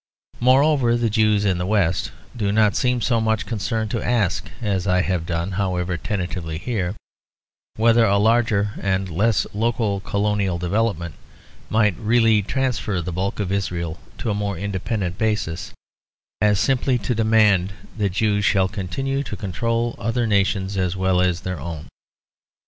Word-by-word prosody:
Moreover, 130 -1 +4
the 115 -2 0
Jews 105 -2 +2
in 95 -3 +1
the 90 - -1
West 95 -5 +1 0.2
do 105 -4 0
not 105 -1 +3
seem 125 -1 +1
so 115 0 +1
much 110 0 0
concerned 110 0 -2
to 115 - -1
ask, 100 -10 0
as 100 -5 -1
I 90 0 +3
have 90 -4 -2
done 85 +2 -2
however 90 -2 -1
tentatively 90 -3 -4
here, 95 -1 -2 0.8
whether 115 +1 +4
a 100 -1 +3
larger 110 -1 +2
and 95 -1 0
less 105 +6 +2
local 110 -2 0
colonial 100 -2 0
development 90 -2 -1 0.6
might 105 -4 +2
really 115 -1 +3
transfer 115 -3 -1
the 90 +1 -4
bulk 95 +4 -2
of 100 -3 -2
Israel 85 -5 -2 0.2
to 115 - -2
a - - +1
more 100 -2 -2
independent 95 0 -3
basis, 105 -7 -1 0.7
as 105 -2 +3
simply 130 -1 +2
to 125 - -2
demand 110 -4 +3 0.2
that 105 -2 0
Jews 105 0 +1
shall 95 -2 +3
continue 135 +9 -3
to 115 -7 -6
control 115 +5 -1
other 115 +3 0
nations 100 -2 +1
as 90 0 -1
well 95 -1 +2
as 90 -2 +1
their 90 0 -4
own. 80 -3 -6
100 Hz, 155 wpm, -22 LUFS, 95-115 Hz, 0.8 s, Moreover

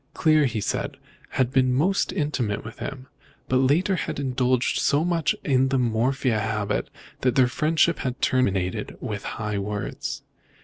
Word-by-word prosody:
Clear, 155 -2 +4
he 115 -4 -1
said, - - -2 0.4
had 130 -1 +2
been 130 -2 +3
most 185 +9 +2
intimate 135 - -1
with 110 - -9
him, 135 -2 -6 0.4
but 130 - +2
later 150 +9 +3
on - - 0
had - - -3
indulged 130 -2 +1
so 145 +3 +2
much 170 -3 +1
in 135 -2 +3
the 135 0 +1
morphia 125 0 +1
habit 105 -1 -1 0.3
that 125 -2 +1
their 130 - +6
friendship 160 +5 +2
had 125 -1 -3
terminated 95 -8 0
with 105 -2 -5
high 105 -2 -2
words. 105 +1 -4
130 Hz, 160 wpm, -25 LUFS, 110-145 Hz, 0.4 s, their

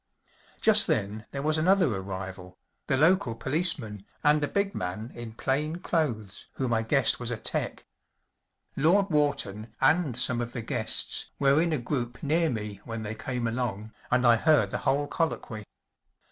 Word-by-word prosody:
Just - - +5
then 105 +3 -1
there 140 0 -5
was 155 +1 +1
another 185 +3 +4
arrival‚ÄĒthe 95 +6 -5
local 155 -7 +3
policeman 130 - -1 0.2
and 150 0 +4
a - - +1
big 200 +3 -1
man 100 +6 -4
in 120 -1 -8
plain 135 +7 -1
clothes 140 - -2
whom 130 -3 -1
I 115 - +2
guessed 130 +4 +2
was 120 -1 -3
a 120 - -1
'tec. - - -2 0.9
Lord 185 +7 +3
Wharton 120 -8 0
and 140 -2 +2
some 120 -1 +3
of 120 0 -5
the 120 - -4
guests - - -1
were 140 +2 +4
in 170 0 +1
a 155 - +1
group 120 -1 -4
near 160 +3 +2
me 105 -4 -5
when 115 -1 -5
they 105 0 -4
came 120 +2 -4
along, 115 -3 -3 0.2
and 125 0 +2
I 120 -1 +6
heard 155 +4 +3
the - - -2
whole 145 +2 +1
colloquy. 145 - -3
125 Hz, 160 wpm, -27 LUFS, 110-150 Hz, 0.9 s, I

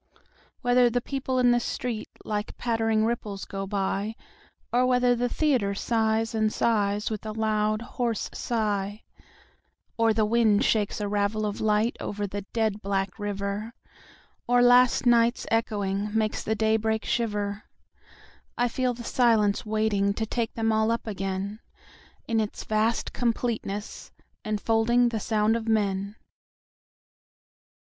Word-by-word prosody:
Whether 245 0 +4
the 245 +1 0
people 260 0 -3
in 245 -1 +4
the 240 - +3
streetLike 215 -3 -4
pattering 225 -2 +1
ripples 215 -4 -3
go 195 0 -5
by, 200 +2 -2 0.6
Or 245 +1 +4
whether 250 -1 +3
the 245 +1 0
theatre 245 -10 +1
sighs 225 +1 0
and 220 -1 +2
sighsWith 210 -1 0
a 215 -1 -5
loud, 215 0 +1
hoarse 240 -3 -2
sigh:Or 215 +1 -4
the 215 0 +2
wind 225 0 +3
shakes 210 -2 +1
a 205 - -1
ravel 205 +1 0
of 205 -1 -3
lightOver 210 -1 0
the 205 +1 -5
dead 220 -2 0
black 195 0 -2
river, 205 +2 -4 0.7
Or 245 0 +4
night's 245 0 +5
last 240 0 +3
echoingMakes 210 -1 0
the 220 - 0
daybreak 220 0 +1
shiver:I 210 +2 -4
feel 250 0 -1
the 235 - -8
silence 225 -4 +2
waitingTo 215 0 0
take 230 0 -2
them 225 -1 +1
all 220 0 +2
up 230 0 0
againIn 195 0 -4 0.7
its 220 -2 -1
vast 220 +2 0
completeness, 230 -4 -3 0.3
enfoldingThe 225 +2 +1
sound 215 0 +2
of 230 -1 -3
men. 200 -2 0
220 Hz, 120 wpm, -26 LUFS, 205-235 Hz, 0.7 s, night's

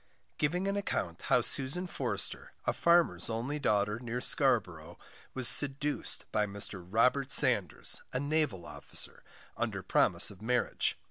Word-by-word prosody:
Giving 175 +6 -2
an 200 - -2
Account 90 - -5
how - - +3
Susan 140 +7 +6
Forster, 125 - -3
a - - -1
Farmer's 170 -5 +1
only 120 +7 -5
Daughter, 105 -4 -1
near 120 0 -6
Scarborough, 95 - 0 0.4
was 130 -2 +2
seduced 145 +1 +2
by 105 -1 -1
Mr 100 -2 -4
Robert 125 +8 0
Sanders, - - +2
a 125 - -3
Naval 145 - -3
Officer, 75 - -5 0.3
under - - -5
promise - - +3
of 100 -1 -16
Marriage. 125 +2 -2
125 Hz, 135 wpm, -29 LUFS, 105-145 Hz, 0.4 s, Susan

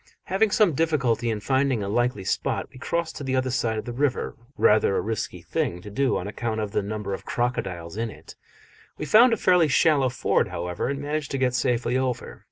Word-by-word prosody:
Having 200 +4 +1
some 205 -4 +3
difficulty 135 -7 +1
in 110 -2 -2
finding 130 -2 +1
a - - -3
likely 120 -1 0
spot, - - -1
we 130 - -13
crossed 170 +2 -2
to - - -6
the 130 -1 -1
other 130 0 0
side 115 -3 0
of 110 - -4
the 120 - -5
river 140 +1 -1 0.2
rather 105 -2 +4
a - - +2
risky 110 0 -4
thing 85 - -2
to 105 +3 -10
do 135 +5 +1
on 90 - -4
account 110 +1 -3
of 105 -2 -3
the - - 0
number 105 -1 -4
of - - -5
crocodiles 95 -8 -3
in 115 0 -1
it: - - -12 0.6
we - - -4
found 235 +8 +6
a 225 - +2
fairly 180 -4 +4
shallow 145 -2 +3
ford, 125 - +1
however, 90 +1 -3
and 140 +1 -3
managed 150 0 -2
to 135 - -2
get 130 -2 +1
safely 125 +1 +1
over. 125 -2 -3
125 Hz, 215 wpm, -25 LUFS, 110-145 Hz, 0.6 s, found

